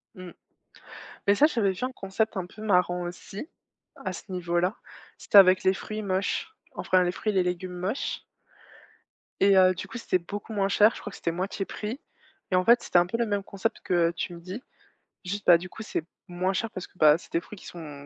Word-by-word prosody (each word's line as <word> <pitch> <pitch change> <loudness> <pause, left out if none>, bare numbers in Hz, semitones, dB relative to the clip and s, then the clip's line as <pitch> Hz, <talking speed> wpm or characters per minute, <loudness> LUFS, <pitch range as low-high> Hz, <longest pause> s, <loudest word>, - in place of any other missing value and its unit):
Mmh. 185 -2 -9 1.0
Mais 200 - +5
ça, 290 - +6
j'avais 225 -10 +1
vu 190 +6 -5
un 260 - -2
concept 220 0 -2
un 185 -2 -2
peu 215 +4 -13
marrant 180 -3 +2
aussi, 185 - -7 0.5
à - - -5
ce - - -10
niveau-là. 175 +2 0 0.4
C'était - - 0
avec 185 -1 +7
les 190 +1 +3
fruits 215 +2 -5
moches, 200 - -2 0.2
enfin, 185 0 +2
les 180 0 0
fruits 215 - -2
et - - -7
les 190 - +4
légumes 180 0 -3
moches 195 +9 -3 1.2
et 195 0 +6
heu, 185 0 +6
du 185 - -7
coup, - - -7
c'était 185 -5 0
beaucoup 205 +5 -7
moins 200 -2 +1
cher, 210 +2 +5
je - - -9
crois - - -6
que - - -11
c'était 170 - -1
moitié 190 +3 -3
prix 220 +8 -5 0.5
et - - +3
en 185 - +3
fait, 235 +4 +5
c'était 175 - +4
un 175 - +2
peu 230 - -2
le 235 - +1
même 205 -2 -1
concept 195 0 -3
que 170 -2 +2
tu 175 +2 -4
me - - -10
dis. 185 +7 -7 0.6
Juste, 200 +2 -4
bah, 175 - +8
du 185 +2 -8
coup, 220 - -9
c'est 190 - -3 0.2
moins 180 +2 -1
cher 225 +3 -2
parce 185 - -7
que, - - -29
bah, 155 -2 +6
c'est - - -16
des 170 - 0
fruits 210 - -12
qui - - -15
sont 150 -5 -9
185 Hz, 225 wpm, -27 LUFS, 180-210 Hz, 1.2 s, bah